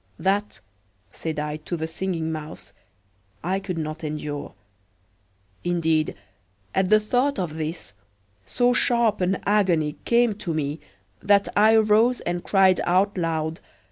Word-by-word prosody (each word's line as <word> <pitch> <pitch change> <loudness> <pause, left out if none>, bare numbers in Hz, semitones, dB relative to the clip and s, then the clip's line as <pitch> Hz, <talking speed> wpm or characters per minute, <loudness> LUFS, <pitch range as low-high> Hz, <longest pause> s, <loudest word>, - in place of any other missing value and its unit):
That," 200 +2 -1 0.5
said 160 -1 -5
I 150 0 -3
to 155 +3 -5
the 160 - -3
Singing 165 -1 -3
Mouse, 155 0 -8 0.7
"I 185 +3 0
could 190 -3 -5
not 155 0 -4
endure." 150 -1 -5 1.1
Indeed, 165 -3 +1 0.6
at 190 -1 +1
the 215 - +6
thought 250 +6 0
of 175 -5 -2
this, 160 -7 -5 0.5
so 245 - +2
sharp 235 -4 +2
an 185 +1 +1
agony 180 -7 +2
came 235 -1 +3
to 170 -6 -3
me 150 0 -2 0.4
that 200 0 +3
I 215 +2 +5
arose 220 +3 +4
and 175 0 -3
cried 190 -2 +4
out 190 +3 +2
loud. 165 -2 -2
180 Hz, 135 wpm, -24 LUFS, 160-205 Hz, 1.1 s, the